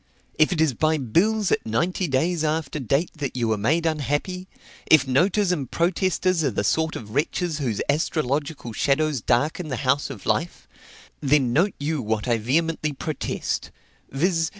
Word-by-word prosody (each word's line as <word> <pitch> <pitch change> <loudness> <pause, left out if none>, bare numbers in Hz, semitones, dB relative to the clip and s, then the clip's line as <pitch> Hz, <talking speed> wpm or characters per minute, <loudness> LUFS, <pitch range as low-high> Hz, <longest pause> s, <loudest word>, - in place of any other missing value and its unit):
If 155 - +5
it 175 - -1
is 160 -4 +3
by 155 +5 +1
bills 190 - +1
at - - +1
ninety 170 - -1
days 160 +5 0
after 155 -1 -1
date 140 +6 0
that 140 -3 -4
you 115 -2 0
are - - +3
made 160 +11 +1
unhappy 160 +5 -1 0.4
if 155 -3 +6
noters 180 +8 +2
and 140 -8 -2
protesters 185 0 +1
are 140 - +2
the 100 -3 -2
sort 160 +9 +1
of 105 -2 -8
wretches 155 +3 -1
whose 120 -7 -1
astrological 145 -3 -1
shadows 145 +1 +1
darken 150 +9 0
the 130 - -3
house 140 +3 +2
of 125 -8 -9
life 170 +2 -1 0.5
then 135 -4 +2
note 180 +8 +2
you 150 0 -1
what 110 0 -2
I 120 -2 +2
vehemently 155 +5 0
protest, 150 +1 -3 0.4
viz. 165 +3 +1
150 Hz, 165 wpm, -24 LUFS, 130-165 Hz, 0.5 s, if